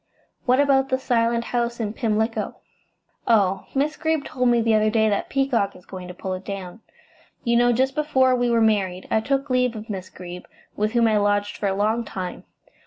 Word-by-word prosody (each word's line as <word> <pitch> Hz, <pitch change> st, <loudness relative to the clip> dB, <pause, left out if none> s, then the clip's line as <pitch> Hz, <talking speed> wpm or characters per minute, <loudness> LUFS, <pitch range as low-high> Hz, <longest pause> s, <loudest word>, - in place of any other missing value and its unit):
What 255 Hz, +2 st, +4 dB
about 270 Hz, -1 st, +3 dB
the 260 Hz, -, +2 dB
Silent 235 Hz, -2 st, +1 dB
House 235 Hz, 0 st, -2 dB
in 215 Hz, -2 st, -2 dB
Pimlico?" 220 Hz, 0 st, -1 dB, 0.7 s
"Oh, 195 Hz, -4 st, +2 dB
Miss 295 Hz, +3 st, 0 dB
Greeb 315 Hz, -3 st, 0 dB
told 250 Hz, -1 st, 0 dB
me 240 Hz, -1 st, +4 dB
the 225 Hz, -1 st, +2 dB
other 215 Hz, 0 st, +3 dB
day 220 Hz, 0 st, +2 dB
that 200 Hz, -, -1 dB
Peacock 260 Hz, -7 st, 0 dB
is 180 Hz, -, -16 dB
going 185 Hz, -1 st, -8 dB
to 180 Hz, -, -8 dB
pull 185 Hz, +1 st, -4 dB
it 185 Hz, +1 st, -6 dB
down. 195 Hz, +1 st, -7 dB, 0.6 s
You 235 Hz, -1 st, +1 dB
know, 240 Hz, +1 st, +4 dB
just 260 Hz, +3 st, +1 dB
before 265 Hz, -4 st, +2 dB
we 245 Hz, -1 st, +1 dB
were 230 Hz, -1 st, +3 dB
married 195 Hz, -4 st, +1 dB
I -, -, +3 dB
took 275 Hz, +3 st, -1 dB
leave 250 Hz, -2 st, +2 dB
of 215 Hz, +1 st, -7 dB
Miss 185 Hz, -2 st, -6 dB
Greeb, 180 Hz, -1 st, -9 dB, 0.3 s
with 215 Hz, +2 st, -1 dB
whom 235 Hz, -1 st, +4 dB
I 215 Hz, -1 st, +3 dB
lodged 205 Hz, 0 st, +1 dB
for 205 Hz, -, -2 dB
a 195 Hz, -, 0 dB
long 215 Hz, +4 st, +1 dB
time. 185 Hz, -4 st, -6 dB
230 Hz, 205 wpm, -23 LUFS, 205-250 Hz, 0.7 s, What